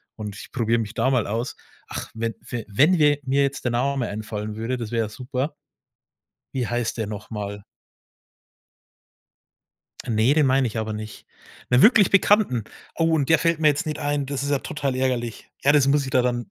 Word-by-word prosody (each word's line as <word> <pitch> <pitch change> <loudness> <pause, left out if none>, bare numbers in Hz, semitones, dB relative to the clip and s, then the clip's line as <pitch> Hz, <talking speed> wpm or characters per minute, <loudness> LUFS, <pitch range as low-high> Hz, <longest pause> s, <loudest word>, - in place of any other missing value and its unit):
und 105 -2 -7
ich - - -11
probiere 115 -2 +1
mich 110 -1 -4
da 120 +2 +1
mal 125 -5 +1
aus.“ 115 +5 -3 0.3
Ach, - - -5
wenn 115 0 -2
f 120 -2 -5
wenn 150 - +4
wir 145 -2 +4
mir 135 +1 +1
jetzt 140 -1 -2
der 120 - +1
Name 130 +1 0
einfallen 105 0 -5
würde, 115 +4 -2
das 115 -3 -6
wäre 115 -1 +1
ja - - -7
super. 130 +5 -4 1.0
Wie 130 -3 -1
heißt 120 -1 -2
der 110 - -1
noch 105 -1 -7
mal? 100 -2 -5 2.5
Ne, 115 +4 +3
den 150 -2 +4
meine 130 0 +3
ich 115 -1 -4
aber 110 0 -2
nicht, 110 0 -8 0.4
'nen 125 0 +5
wirklich 215 -4 +6
Bekannten. 195 - +3 0.3
Oh, 165 0 +2
und 145 -4 +1
der 160 - +5
fällt 165 +1 +1
mir 155 - +5
jetzt 145 +1 0
nicht 155 -1 -3
ein, 145 -1 -1
das 140 0 -3
ist 140 - -2
ja 140 - +2
total 135 -2 -3
ärgerlich. 125 -3 -2
Ja, 140 - +4
das 145 -2 +5
muss 140 +1 +3
ich 130 - -5
dir 130 - +3
dann 120 -1 -2
125 Hz, 200 wpm, -23 LUFS, 115-145 Hz, 2.5 s, wirklich